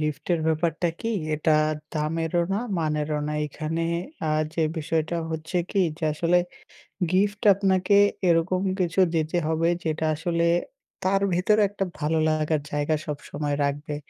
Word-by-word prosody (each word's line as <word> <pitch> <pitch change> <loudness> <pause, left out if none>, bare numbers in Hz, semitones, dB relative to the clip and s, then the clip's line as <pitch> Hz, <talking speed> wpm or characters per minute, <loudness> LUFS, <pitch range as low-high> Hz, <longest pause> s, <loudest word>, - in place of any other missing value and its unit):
gift 150 -1 -3
এর 165 - -2
ব্যাপারটা 160 +2 +1
কি 230 - -2 0.2
এটা 155 +1 +2 0.4
দামেরও 165 +2 0
না, 195 - +1 0.2
মানেরও 150 -1 -1
না। - - -2
এখানে 155 +3 -3 0.5
আ - - +1 0.2
যে 165 - +1
বিষয়টা 160 +1 -1
হচ্ছে 160 +3 -4
কি, 200 - +1 0.2
যে 160 - -3
আসলে 170 +3 +2 0.7
gift 205 +2 +1
আপনাকে 190 0 +2 0.3
এরকম 175 +2 +2 0.2
কিছু 175 +1 0 0.2
দিতে 160 +2 0
হবে, 160 +1 +1
যেটা 160 0 -1
আসলে 170 +2 0 0.6
তার 195 +1 +2
ভেতরে 210 +5 +3
একটা 200 -1 -2
ভালো 160 +2 0
লাগার 155 -1 +1
জায়গা 145 +1 0
সব 150 -2 -3
সময় 145 -1 -2
রাখবে। 145 +2 -2
160 Hz, 145 wpm, -25 LUFS, 155-180 Hz, 0.7 s, ভেতরে